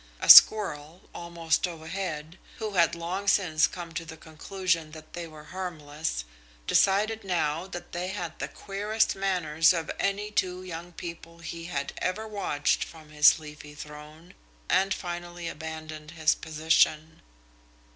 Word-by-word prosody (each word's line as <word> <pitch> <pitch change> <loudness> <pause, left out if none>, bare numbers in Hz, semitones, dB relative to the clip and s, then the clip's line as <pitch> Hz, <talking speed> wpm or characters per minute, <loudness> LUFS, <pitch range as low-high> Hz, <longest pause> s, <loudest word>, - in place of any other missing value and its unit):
A - - -3
squirrel, 165 -5 +8
almost 170 0 -1
overhead, 165 -1 -6 0.2
who 220 -2 -4
had 170 -4 +3
long 180 +4 -4
since 175 -5 +3
come 175 -2 -8
to 165 - -4
the 160 0 -10
conclusion 165 0 -3
that 155 -1 -13
they 175 -1 -6
were 155 -1 -13
harmless, 155 - -4 0.4
decided 210 - +2
now 170 -2 -1
that 175 -2 -8
they 175 +1 -3
had 175 -3 -5
the - - -3
queerest 210 +3 -1
manners 175 -4 +2
of 165 -2 -3
any 205 +1 -1
two 185 -2 -1
young 175 -1 -7
people 170 -1 -9
he 165 0 -7
had 140 -5 -4
ever 220 +4 -2
watched 200 -9 0
from 160 -2 -13
his 150 0 +6
leafy 150 -1 -11
throne, 150 +3 -11 0.3
and 195 0 +2
finally 175 -1 -5
abandoned 155 -1 -7
his 155 -1 +2
position. 160 0 +1
170 Hz, 140 wpm, -27 LUFS, 155-185 Hz, 0.4 s, squirrel